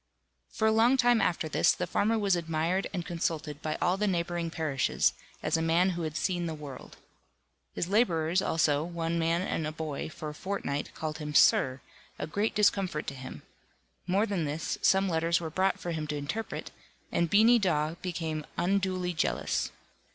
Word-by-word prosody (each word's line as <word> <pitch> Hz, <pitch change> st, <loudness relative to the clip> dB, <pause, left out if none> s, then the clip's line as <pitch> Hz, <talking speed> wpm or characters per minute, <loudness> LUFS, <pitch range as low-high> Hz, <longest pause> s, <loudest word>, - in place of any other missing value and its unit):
For 220 Hz, -, +1 dB
a -, -, +4 dB
long 230 Hz, +4 st, +4 dB
time 245 Hz, -2 st, +4 dB
after 170 Hz, -2 st, 0 dB
this, 155 Hz, -, +3 dB
the -, -, -2 dB
farmer 225 Hz, +2 st, +1 dB
was 200 Hz, -3 st, +2 dB
admired 165 Hz, +3 st, -1 dB
and 175 Hz, -4 st, -4 dB
consulted 160 Hz, -3 st, -3 dB
by 155 Hz, 0 st, -2 dB
all 180 Hz, +2 st, +2 dB
the 210 Hz, +1 st, +1 dB
neighbouring 175 Hz, -2 st, -1 dB
parishes, 155 Hz, -5 st, +1 dB, 0.3 s
as 165 Hz, -, +1 dB
a -, -, -1 dB
man 170 Hz, +3 st, +3 dB
who 175 Hz, -1 st, -4 dB
had 155 Hz, -1 st, -3 dB
seen 175 Hz, -2 st, -1 dB
the 160 Hz, -, -4 dB
world. 145 Hz, -3 st, -10 dB, 0.8 s
His 170 Hz, -, -1 dB
labourers, 180 Hz, -5 st, +2 dB
also, 150 Hz, -4 st, +2 dB
one 170 Hz, 0 st, -2 dB
man 165 Hz, +2 st, +1 dB
and 160 Hz, -4 st, -2 dB
a -, -, -3 dB
boy, 155 Hz, -2 st, -4 dB
for 155 Hz, -1 st, -6 dB
a -, -, -7 dB
fortnight 150 Hz, -5 st, -3 dB
called 155 Hz, -1 st, -4 dB
him 150 Hz, -1 st, -5 dB
"Sir," 130 Hz, -1 st, +5 dB, 0.4 s
a -, -, -3 dB
great 205 Hz, +8 st, -1 dB
discomfort 195 Hz, -6 st, +2 dB
to -, -, -4 dB
him; 130 Hz, -1 st, -9 dB, 0.6 s
more 195 Hz, +4 st, +2 dB
than 195 Hz, -7 st, -1 dB
this, 150 Hz, +2 st, -3 dB
some 195 Hz, 0 st, +4 dB
letters 170 Hz, 0 st, +1 dB
were 165 Hz, -2 st, -5 dB
brought 190 Hz, +4 st, +1 dB
for 175 Hz, -, -4 dB
him 155 Hz, -2 st, -3 dB
to 150 Hz, 0 st, -3 dB
interpret, 180 Hz, +11 st, -4 dB, 0.4 s
and 170 Hz, -1 st, +1 dB
Beany 225 Hz, +5 st, +6 dB
Dawe 155 Hz, -6 st, +1 dB
became 160 Hz, -4 st, -3 dB
unduly 185 Hz, 0 st, 0 dB
jealous. 160 Hz, -, 0 dB
170 Hz, 180 wpm, -29 LUFS, 155-190 Hz, 0.8 s, Beany